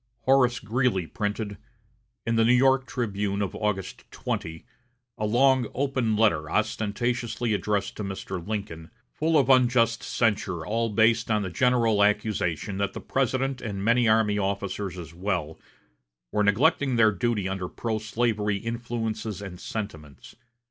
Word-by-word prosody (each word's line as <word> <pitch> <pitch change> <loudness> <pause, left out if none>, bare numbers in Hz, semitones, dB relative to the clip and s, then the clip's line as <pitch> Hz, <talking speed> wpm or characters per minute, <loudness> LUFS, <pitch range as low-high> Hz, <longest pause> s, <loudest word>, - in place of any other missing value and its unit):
Horace 125 -1 +3
Greeley 115 -5 0
printed, 105 +2 -4 0.7
in 115 - 0
the 115 - +4
New 120 +2 +5
York 130 +1 +3
"Tribune" 100 -4 -2
of 95 - -4
August 105 -3 -3
20, 80 0 -5 0.5
a 105 - 0
long 130 +2 +3
"open 130 -5 0
letter" 85 -9 +2
ostentatiously 110 +2 -1
addressed 105 -1 -1
to 105 - -4
Mr. 95 -2 -5
Lincoln, 100 -5 -5 0.2
full 160 +1 +1
of 135 -4 +3
unjust 120 -3 +4
censure 100 -7 -1
all 115 +3 0
based 115 +2 +3
on 105 -1 +1
the 95 - -4
general 115 -2 +3
accusation 105 -3 0
that 100 -1 -1
the - - -6
President 135 0 -1
and 100 -4 -4
many 120 +1 +4
army 110 -1 +3
officers 100 -1 -3
as 85 -2 -8
well, 85 -4 -3 0.7
were 105 - +1
neglecting 130 - +3
their 110 -2 +5
duty 110 -2 -1
under 95 -2 -3
pro 110 -2 -3
slavery 110 -2 0
influences 115 -2 -4
and 95 -3 -8
sentiments. 80 -10 -7
110 Hz, 140 wpm, -26 LUFS, 100-120 Hz, 0.7 s, New